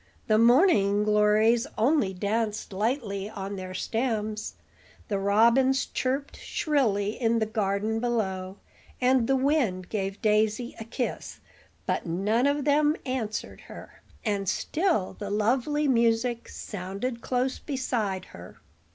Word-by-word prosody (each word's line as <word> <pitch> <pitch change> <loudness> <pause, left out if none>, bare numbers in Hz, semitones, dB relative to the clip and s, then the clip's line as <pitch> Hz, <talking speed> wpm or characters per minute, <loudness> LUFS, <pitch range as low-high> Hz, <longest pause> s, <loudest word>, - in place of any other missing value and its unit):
The 215 -2 +3
morning 230 - +4
glories 210 +2 +3
only 230 -2 +2
danced 210 +2 -2
lightly 205 -2 -2
on 200 -1 -6
their 185 -1 -7
stems, 220 -2 -2 0.5
the 200 -2 0
robins 235 +7 +3
chirped 270 +2 -2
shrilly 225 -10 0
in 230 0 +2
the 220 - +1
garden 215 +1 -1
below, 195 -5 -2 0.4
and 250 -2 +3
the 270 - +3
wind 260 - 0
gave 195 -2 -3
Daisy 215 +3 +1
a 225 - -6
kiss; 245 +2 -4 0.5
but - - -1
none 210 +9 +1
of 285 0 0
them 300 +1 +3
answered 245 -5 -4
her, - - -12 0.2
and 200 -3 0
still 315 - 0
the 205 - -4
lovely 255 +8 +1
music 235 -1 +1
sounded 205 +5 -5
close 255 +1 -1
beside 230 -9 -2
her. 90 +1 -11
220 Hz, 125 wpm, -27 LUFS, 200-255 Hz, 0.5 s, morning